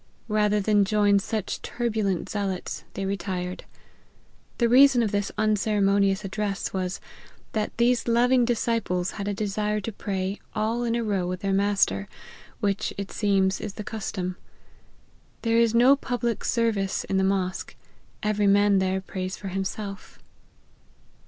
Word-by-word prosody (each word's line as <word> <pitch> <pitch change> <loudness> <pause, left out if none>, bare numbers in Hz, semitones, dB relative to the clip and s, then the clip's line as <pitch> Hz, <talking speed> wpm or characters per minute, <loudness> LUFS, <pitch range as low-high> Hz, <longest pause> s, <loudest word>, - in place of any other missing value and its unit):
Rather 210 0 +2
than 205 0 +3
join 205 0 +3
such 215 0 -3
turbulent 215 -6 -1
zealots, 195 -3 -3
they 195 - -3
re 195 +1 0
tired. 180 -2 -4 0.9
The 235 - +3
reason 255 0 +6
of 215 - -1
this 205 -1 -1
unceremonious 205 -2 +2
address 200 0 -3
was, 185 -1 -2 0.5
that 215 -1 -2
these 240 +1 +2
loving 245 +2 +4
disciples 225 -6 0
had 200 -1 -5
a 205 - 0
desire 210 0 -1
to 225 - -4
pray 195 -1 -3 0.2
all 225 +3 0
in 235 -1 0
a 235 - 0
row 195 -5 0
with 180 0 -4
their 195 -1 0
master, 195 - +2 0.5
which, 200 -1 0
it 200 -1 -5
seems, 195 -2 +1
is 210 -2 -5
the 210 - -5
custom. 190 -4 -4 1.1
There 230 -1 +2
is 230 -1 +3
no 250 +4 +7
public 245 -4 -2
service 220 -5 0
in 190 - -1
the 190 - +2
mosque; 190 -1 -1 0.5
every 210 -1 +1
man 200 0 +4
there 190 0 0
prays 185 0 -5
for 195 - -6
himself." 195 +2 -5
205 Hz, 145 wpm, -26 LUFS, 195-220 Hz, 1.1 s, no